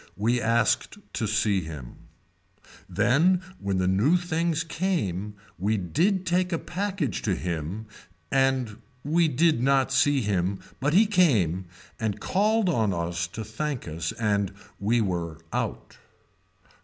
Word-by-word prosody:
We 115 +4 +1
asked 115 - +1 0.2
to 110 - -1
see 105 -2 +2
him. 75 -7 -9 0.8
Then 175 +9 +3 0.2
when 100 -1 -1
the 90 0 +1
new 110 - +3
things 170 -2 -1
came 155 - -2 0.2
we 105 +4 +1
did 175 - +1
take 180 +1 +1
a 165 - +1
package 185 -4 -2
to - - 0
him 85 - -4 0.5
and 130 -5 +1 0.3
we 165 +3 +3
did 155 -2 +2
not 135 0 +3
see 135 +1 +3
him 95 -1 0 0.2
but 145 +5 +1
he 215 +4 +7
came 110 - +2 0.3
and 105 -2 -2
called 210 - +2
on 110 - +1
us 85 0 -2
to 110 +6 -6
thank 125 +4 -4
us 80 +1 -3
and 100 -3 0 0.3
we 115 +4 +2
were 85 -5 -2 0.2
out. - - -4
115 Hz, 135 wpm, -26 LUFS, -, 0.8 s, he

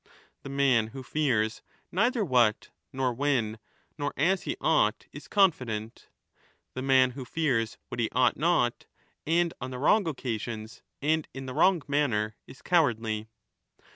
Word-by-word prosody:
The - - -8
man 135 -5 +2
who 130 +4 -9
fears 120 -7 0 0.3
neither 230 +3 +1
what, 120 - +2 0.2
nor 130 -2 -1
when, 120 -5 0 0.4
nor 145 0 -2
as 190 +1 +2
he 340 - -2
ought - - +2
is - - -11
confident; 125 - 0 0.6
the 130 - -4
man 130 -1 +4
who 130 +1 -7
fears 125 -5 -1
what - - -6
he 115 - +1
ought 125 -1 +3
not, 150 -6 +1 0.4
and 170 +1 +2
on 130 - -4
the 130 - -6
wrong 175 +8 +3
occasions, 115 -6 -5 0.2
and 155 +1 +1
in 135 0 -6
the 130 - -6
wrong 180 +2 +3
manner 115 -7 0
is 135 - -14
cowardly. 115 - +1
130 Hz, 145 wpm, -28 LUFS, 115-155 Hz, 0.6 s, man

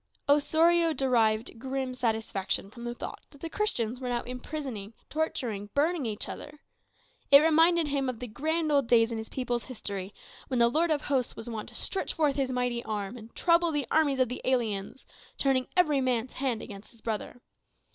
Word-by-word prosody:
Osorio 325 +3 +4
derived 230 -4 +2
grim 265 0 -3
satisfaction 220 -5 -1
from 235 +1 -10
the 240 0 -3
thought - - -7
that 285 - -17
the 325 +2 -6
Christians 250 - -1
were 255 -1 -4
now 240 -1 -1
imprisoning, 250 -4 -6 0.2
torturing, 240 -10 -2
burning 305 -2 +1
each 210 -1 -3
other. 295 0 -8 0.7
It 280 - +11
reminded 325 +2 +4
him 275 -2 0
of 250 - -4
the 250 - -4
grand 310 +7 -1
old 280 -4 +3
days 230 -1 +4
in 225 - -2
his 220 - -7
people's 245 -2 -2
history, 200 -6 -5 0.4
when 255 - -1
the 235 0 +5
Lord 325 +7 +2
of 300 -2 +1
hosts 265 -5 -1
was 225 - -8
wont 225 -2 -5
to - - -13
stretch 390 - -2
forth 300 -4 +2
his 270 -2 0
mighty 245 -2 -1
arm 210 0 -3
and 230 -1 -12
trouble 335 -1 +3
the 295 -3 0
armies 290 -4 +3
of 255 - +4
the 250 - -5
aliens, 235 -2 -1 0.3
turning 265 -2 +2
every 305 -6 +4
man's 250 -1 0
hand 255 -4 -1
against 200 0 -10
his 230 - -19
brother. 225 +2 -4
255 Hz, 185 wpm, -29 LUFS, 230-295 Hz, 0.7 s, It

